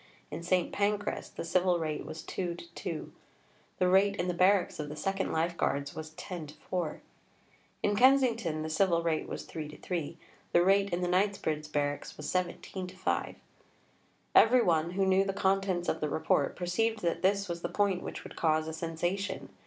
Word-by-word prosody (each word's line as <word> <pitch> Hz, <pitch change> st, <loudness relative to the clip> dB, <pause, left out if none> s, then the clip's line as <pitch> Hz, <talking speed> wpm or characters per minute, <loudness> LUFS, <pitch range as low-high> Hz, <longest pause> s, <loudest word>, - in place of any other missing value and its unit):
In -, -, -5 dB
St. 180 Hz, +1 st, +1 dB
Pancras 205 Hz, 0 st, -1 dB
the -, -, -6 dB
civil 180 Hz, 0 st, +2 dB
rate 155 Hz, -2 st, -3 dB
was 155 Hz, +1 st, -7 dB
2·2; 185 Hz, -, -5 dB, 0.7 s
the 185 Hz, -, +3 dB
rate 195 Hz, +2 st, +4 dB
in 180 Hz, -, -2 dB
the 180 Hz, -, 0 dB
barracks 185 Hz, 0 st, +3 dB
of 150 Hz, -1 st, -3 dB
the 150 Hz, -, -6 dB
2nd 195 Hz, +4 st, -1 dB
Life 165 Hz, +2 st, 0 dB
Guards 140 Hz, +1 st, -1 dB
was 155 Hz, 0 st, -6 dB
10·4. 170 Hz, -1 st, -5 dB, 0.8 s
In 205 Hz, -, +2 dB
Kensington 230 Hz, -, +3 dB
the 160 Hz, -, -3 dB
civil 170 Hz, 0 st, +2 dB
rate 165 Hz, -2 st, 0 dB
was -, -, -5 dB
3·3; 160 Hz, +1 st, -5 dB, 0.4 s
the 175 Hz, -, +6 dB
rate 195 Hz, +2 st, +4 dB
in 175 Hz, -1 st, -1 dB
the 180 Hz, -, 0 dB
Knightsbridge 175 Hz, -5 st, 0 dB
barracks 145 Hz, -1 st, -2 dB
was 150 Hz, -, -7 dB
17·5. 185 Hz, +1 st, -2 dB, 1.0 s
Every 240 Hz, +2 st, +7 dB
one 165 Hz, -1 st, +2 dB
who 195 Hz, +1 st, +2 dB
knew 190 Hz, 0 st, +4 dB
the 195 Hz, 0 st, -2 dB
contents 190 Hz, -2 st, +1 dB
of -, -, -1 dB
the 150 Hz, -, 0 dB
Report 145 Hz, -2 st, +1 dB
perceived 215 Hz, +5 st, 0 dB
that 170 Hz, -, 0 dB
this 200 Hz, +1 st, +2 dB
was 170 Hz, -1 st, -4 dB
the -, -, -2 dB
point 200 Hz, -3 st, +1 dB
which -, -, -6 dB
would -, -, -10 dB
cause 155 Hz, -1 st, +1 dB
a 160 Hz, -, -4 dB
sensation. 175 Hz, +5 st, -3 dB
180 Hz, 170 wpm, -31 LUFS, 160-195 Hz, 1.0 s, Every